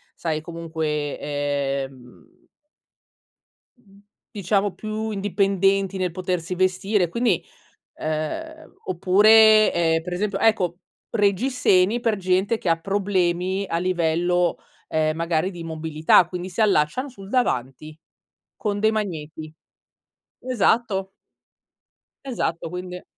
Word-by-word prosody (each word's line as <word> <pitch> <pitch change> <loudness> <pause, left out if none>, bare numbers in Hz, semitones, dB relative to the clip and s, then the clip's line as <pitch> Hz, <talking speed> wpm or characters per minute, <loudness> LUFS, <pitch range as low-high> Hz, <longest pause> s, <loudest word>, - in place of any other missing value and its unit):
sai, 155 -2 -2
comunque, 160 -3 -3
ehm 140 -3 -4 1.3
mhmm, 200 -4 -22 0.3
diciamo 200 -1 0
più 215 0 -4
indipendenti 195 -1 +1
nel 185 -2 -1
potersi 180 -1 -3
vestire, 185 +1 +1
quindi 225 -1 0 0.6
uhm 315 - -4
oppure, 215 +4 +6
ehm, 165 -1 +1
per 180 +1 -7
esempio 195 +2 -1
ecco 185 -6 +1 0.3
reggiseni 205 -1 +2
per 225 -3 +1
gente 190 +4 +1
che 185 - -4
ha 165 - +3
problemi 190 0 0
a 165 - -1
livello, 175 0 +1 0.3
ehm, 155 0 0
magari 165 +1 0
di 175 -3 -10
immobilità, 160 +1 +2
quindi 180 +1 -5
si 180 - -4
allacciano 210 - +2
sul 195 -7 -12
davanti, 155 - -2 0.6
con 205 -1 -2
dei 220 +1 +4
magneti. 160 -7 -5 1.0
Esatto. 205 -4 +1 1.1
Esatto, 170 -10 -3
quindi 180 0 -7
185 Hz, 105 wpm, -23 LUFS, 165-205 Hz, 1.3 s, oppure